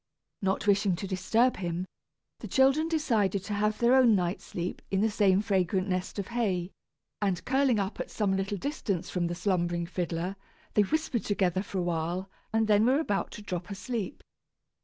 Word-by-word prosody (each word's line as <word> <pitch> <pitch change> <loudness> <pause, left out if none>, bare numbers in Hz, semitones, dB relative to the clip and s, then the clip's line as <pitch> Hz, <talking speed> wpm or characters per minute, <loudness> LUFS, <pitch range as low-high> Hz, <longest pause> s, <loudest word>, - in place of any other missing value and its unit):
Not 195 0 0
wishing 200 -2 +3
to 190 - -5
disturb 220 +7 +2
him, 175 0 -3 0.5
the - - -7
children 275 +4 +3
decided 225 - +1
to 205 +1 -4
have 210 +1 +1
their 235 +1 +4
own 250 -4 +6
night's 180 -1 -1
sleep 175 +1 -4
in 195 0 +1
the 220 0 +2
same 200 -1 +3
fragrant 190 -2 +1
nest 185 +1 -2
of 200 +1 -3
hay; 195 -7 -1 0.5
and 195 -4 0
curling 265 -3 +3
up 195 0 -2
at - - -4
some 200 -3 0
little 195 +1 -1
distance 195 - -3
from 175 -2 0
the 175 - -3
slumbering 175 -2 0
fiddler, 175 +2 -3 0.4
they 210 - +5
whispered 245 0 0
together 190 -3 +1
for 200 -1 -6
a 180 - +1
while, 175 +3 -2 0.2
and 225 -1 +2
then 210 0 +5
were 265 +3 +4
about 205 -11 -1
to 210 - -9
drop 180 -3 -4
asleep. 205 +1 -4
195 Hz, 180 wpm, -29 LUFS, 180-220 Hz, 0.5 s, own